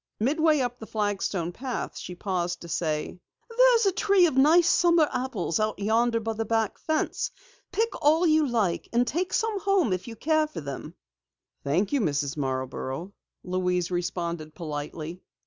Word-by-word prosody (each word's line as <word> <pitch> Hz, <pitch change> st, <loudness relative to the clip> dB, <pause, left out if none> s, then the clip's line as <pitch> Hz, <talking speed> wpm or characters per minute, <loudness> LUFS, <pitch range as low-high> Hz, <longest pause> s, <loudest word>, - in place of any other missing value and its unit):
Midway 305 Hz, +5 st, +3 dB
up 245 Hz, -1 st, -3 dB
the 220 Hz, -, -9 dB
flagstone 200 Hz, -5 st, -1 dB
path 250 Hz, +6 st, -5 dB
she 180 Hz, -, -7 dB
paused 175 Hz, -2 st, -2 dB
to 170 Hz, -, -9 dB
say: 155 Hz, +1 st, -2 dB, 0.4 s
"There's -, -, +5 dB
a 390 Hz, -, +4 dB
tree 395 Hz, -1 st, +4 dB
of 315 Hz, -, 0 dB
nice 320 Hz, +6 st, +5 dB
summer 340 Hz, -3 st, +4 dB
apples 215 Hz, -10 st, -1 dB
out 215 Hz, 0 st, 0 dB
yonder 230 Hz, +3 st, +2 dB
by 225 Hz, 0 st, -3 dB
the 225 Hz, +1 st, -2 dB
back 225 Hz, -1 st, -1 dB
fence. 315 Hz, +10 st, -1 dB, 0.4 s
Pick 450 Hz, +4 st, +1 dB
all 315 Hz, +4 st, +4 dB
you 310 Hz, -2 st, +4 dB
like 215 Hz, -8 st, 0 dB
and 240 Hz, +1 st, +3 dB
take 355 Hz, +9 st, -2 dB
some 445 Hz, -3 st, 0 dB
home 385 Hz, -, +2 dB
if 185 Hz, +4 st, -4 dB
you 230 Hz, -, -7 dB
care 310 Hz, +5 st, +1 dB
for 300 Hz, -, -7 dB
them." 140 Hz, -2 st, -7 dB, 0.7 s
"Thank 175 Hz, -, 0 dB
you, 280 Hz, -, +2 dB
Mrs. 145 Hz, -6 st, -1 dB
Marborough," 135 Hz, +5 st, -3 dB, 0.3 s
Louise 180 Hz, -1 st, -1 dB
responded 170 Hz, -3 st, -3 dB
politely. 155 Hz, +1 st, -6 dB
220 Hz, 165 wpm, -26 LUFS, -, 0.7 s, There's